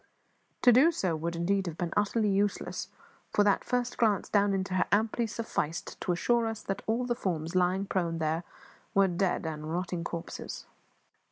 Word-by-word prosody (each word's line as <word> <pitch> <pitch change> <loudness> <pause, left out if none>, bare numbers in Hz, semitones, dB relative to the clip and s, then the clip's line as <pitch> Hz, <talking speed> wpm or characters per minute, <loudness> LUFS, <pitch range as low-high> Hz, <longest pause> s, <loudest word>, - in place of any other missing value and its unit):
To 245 - +8
do 270 +8 +6
so 185 - -1
would 170 +2 -3
indeed 190 +3 0
have 165 -1 -5
been 175 -2 -2
utterly 210 +1 +2
useless, 200 +1 -1 0.4
for 205 - +3
that 205 -1 +3
first 245 -1 -1
glance 215 -5 +2
down 205 -1 +3
into 190 -1 -1
her 185 - +2
amply 220 +3 +2
sufficed 175 -8 -3
to 180 - 0
assure 230 +7 +2
us 225 -1 -5 0.2
all 230 +3 +1
that - - -4
the 240 - +2
forms 165 -3 -2
lying 185 +2 +2
prone 170 -4 -1
there 160 +1 -1 0.5
were 195 0 +5
dead 180 -1 0
and 155 -1 -4
rotting 175 0 -2
corpses. 170 0 -6
190 Hz, 175 wpm, -30 LUFS, 170-215 Hz, 0.5 s, To